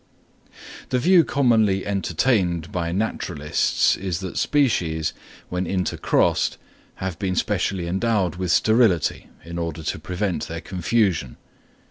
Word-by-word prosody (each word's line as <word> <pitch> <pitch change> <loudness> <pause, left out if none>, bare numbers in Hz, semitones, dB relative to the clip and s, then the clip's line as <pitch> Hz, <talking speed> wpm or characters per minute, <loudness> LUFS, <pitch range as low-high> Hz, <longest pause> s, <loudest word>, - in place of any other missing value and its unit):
The 125 - +1
view 175 +6 +5
commonly 110 -10 +2
entertained 95 -2 0
by 85 -4 -2
naturalists 90 -6 0
is 90 -3 -3
that 95 -2 -6
species, 85 - +1 0.4
when 90 0 -2
intercrossed, 90 0 +1 0.4
have 95 -3 -5
been 95 -2 -1
specially 90 0 -1
endowed 95 -1 0
with 90 -2 -1
sterility, 110 - +2 0.2
in 85 +1 -5
order 85 -1 -4
to 80 - -3
prevent 90 +3 -2
their 85 +1 -6
confusion. 95 - 0
95 Hz, 115 wpm, -23 LUFS, 85-105 Hz, 0.4 s, view